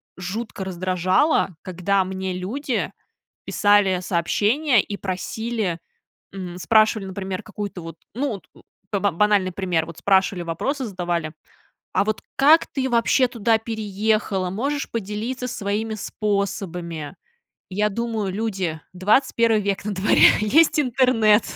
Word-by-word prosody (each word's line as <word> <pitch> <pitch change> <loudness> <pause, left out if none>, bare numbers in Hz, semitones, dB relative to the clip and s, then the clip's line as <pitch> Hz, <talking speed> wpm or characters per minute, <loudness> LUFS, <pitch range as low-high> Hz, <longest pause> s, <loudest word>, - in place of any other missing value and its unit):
жутко 195 +3 -5
раздражало, 185 - +1
когда 185 +2 0
мне 190 0 -4
люди 235 +9 -3 0.5
писали 205 -3 +3
сообщения, 210 - +2
и 200 - -6
просили, 200 0 -3 0.6
м, 180 -2 -6
спрашивали, 215 +1 +3
например, 190 -1 -5
какую-то 205 -3 -6
вот, 165 -1 -8 0.2
ну 275 +6 -1
вот 200 -3 -8
у - - -19 0.4
ба 200 0 +1
банальный 200 0 +2
пример, 175 -4 0
вот 165 -1 -10
спрашивали, 190 -2 +2
вопросы 255 - -2
задавали: 175 -5 -3 0.6
"А - - +3
вот 215 0 -2
как 305 +4 +6
ты 265 -1 -2
вообще 240 +2 +3
туда 230 -2 +1
переехала? 215 -3 -1
Можешь 275 +9 -2
поделиться 230 +4 -3
своими 215 0 -2
способами?". 185 -7 -3 0.5
Я 205 +3 +1
думаю: 220 -2 -2
люди, 190 -6 -2
21 220 +3 +2
век 200 0 -2
на 210 - -2
дворе, 190 +3 +6
есть 305 +8 +4
интернет. 245 -5 +4
205 Hz, 120 wpm, -22 LUFS, 185-230 Hz, 0.6 s, как